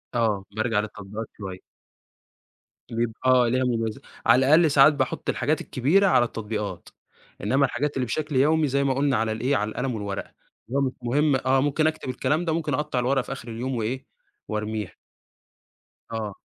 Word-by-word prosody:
آه، 105 -5 +1
بارجع 110 -1 +1
للتطبيقات 105 +1 -6
شوية. 95 -3 -7 1.3
بيب 115 0 -1
آه 130 -1 +5
ليها 130 +2 +1
مُمَيز 115 -3 -1 0.3
على 130 +1 +5
الأقل 155 +2 +5
ساعات 145 +2 +7
باحُط 145 - -2
الحاجات - - 0
الكبيرة 165 +11 +2
على 125 -9 +4
التطبيقات، 105 -5 -5 0.5
إنما 135 +8 +3
الحاجات 145 +3 -2
اللي 130 - 0
بشكل 150 +4 -3
يومي 150 +3 +3
زي 140 +1 +1
ما 135 -1 +2
قُلنا 135 -1 +1
على 110 0 0
الإيه 125 +6 0
على 105 0 0
القلم 125 +1 -3
والورقة، 100 -2 -5 0.3
اللي 130 - -2
هو - - +1
مش 130 - +1
مهم 145 +4 +2
آه، 130 +1 +2
ممكن 145 +3 +2
اكتب 155 -4 -3
الكلام 145 +7 0
ده 160 - 0
ممكن 155 -3 -1
اقطّع 140 -2 -1
الورقة 130 +2 +2
في 125 - -9
آخر 135 -4 -7
اليوم 125 +3 -3
وإيه؟ 120 +3 -3 0.4
وارميها. 105 -2 -3 1.2
آه. 110 -3 -3
125 Hz, 170 wpm, -25 LUFS, 110-140 Hz, 1.3 s, ساعات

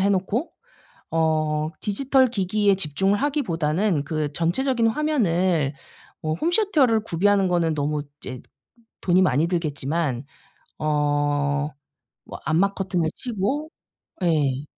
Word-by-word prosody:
해 195 - +3
놓고 200 - 0 0.6
어 155 -1 +1
디지털 260 +5 +2
기기에 200 -1 +2
집중을 190 +4 +1
하기보다는 180 - 0
그 150 0 -2
전체적인 230 - +1
화면을 185 - +1 0.5
어 155 0 -1
홈시어터를 315 - +2
구비하는 195 +1 +2
거는 170 -3 +1
너무 150 0 -1 0.2
이제 130 -1 -7 0.6
돈이 180 0 +3
많이 155 -2 +3
들겠지만 150 -5 -1 0.5
어 145 -1 0 0.5
뭐 - - -9
암막 190 +6 +2
커튼을 180 -4 -1
치고 260 +7 -2 0.5
예. 145 -5 +1
175 Hz, 245 characters per minute, -24 LUFS, 150-210 Hz, 0.6 s, 해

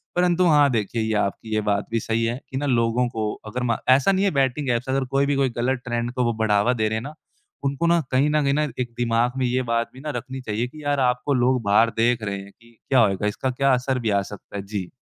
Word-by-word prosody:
परंतु 180 0 +3
हाँ, 145 -3 +5
देखिए 115 0 -1
ये 110 0 -1
आपकी 105 +2 -2
ये 110 - +1
बात 105 -1 0
भी 115 - +1
सही 115 +1 -1
है 120 +2 -2
कि 130 - -4
ना 145 - -2
लोगों 120 -1 +1
को 110 -3 -2
अगर 125 +4 -4
मा 115 -2 +1
ऐसा 130 +8 +5
नहीं 195 +1 +1
है 195 - +2
बैटिंग 135 +1 +1
ऐप्स 120 +2 -2
अगर 135 0 0
कोई 140 +1 +2
भी 140 0 0
कोई 135 -2 +2
गलत 125 +1 0
ट्रेंड 120 0 -2
को 125 -2 0
बढ़ावा 110 +1 +2
दे 110 -3 0
रहे 110 - -1
हैं 110 - -2
ना, 145 +3 -7 0.5
उनको 140 +4 -1
ना 170 0 +4
कहीं 135 +3 +3
न 150 0 +2
कहीं 145 +2 +1
एक 120 -2 -3
दिमाग 120 0 +1
में 130 - +1
ये 125 +1 +1
बात 115 0 0
भी 130 - -12
ना 150 - -5
रखनी 130 +2 -7
चाहिए 115 0 -2
कि 150 +4 -12
यार 145 -1 0
आपको 125 +2 +1
लोग 125 0 +2
बाहर 105 +3 +4
देख 115 0 +2
रहे 100 -1 -2
हैं 100 +1 -13
कि 115 0 -22
क्या 130 -2 +4
होएगा? 105 -2 +2
इसका 130 +5 -2
क्या 135 +1 +2
असर 125 +1 0
भी 115 - -1
आ 100 -1 +2
सकता 100 +1 -10
है? 100 - -4
जी। 100 -3 -4
125 Hz, 265 wpm, -23 LUFS, 110-135 Hz, 0.5 s, हाँ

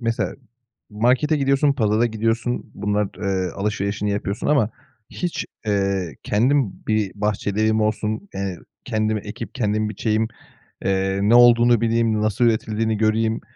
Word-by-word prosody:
mesela 115 -1 -1 0.6
markete 125 +8 +2
gidiyorsun, 140 +1 +2
pazara 110 -2 +2
gidiyorsun, 115 +2 -2
bunlar 105 0 -1
t - - -15
eee, 95 -2 -1
alışverişini 100 0 -2
yapıyorsun 100 +1 -3
ama 130 -7 +3 0.4
hiç, 175 -2 -3 0.2
eee, 95 -5 0
kendim 125 +1 +1
bir 110 -3 0
bahçeli 105 0 -1
evim 110 0 +2
olsun, 110 -1 -1
eee, 95 -3 -3 0.3
kendim 110 0 0
ekip 105 +1 -8
kendim 110 -3 0
biçeyim, 110 +1 0 0.6
eee, 95 0 0
ne 110 +4 +4
olduğunu 120 -1 +6
bileyim 115 -1 +1
nasıl 110 +3 +1
üretildiğini 110 -1 0
göreyim 110 +1 +1
110 Hz, 135 wpm, -22 LUFS, 105-115 Hz, 0.6 s, olduğunu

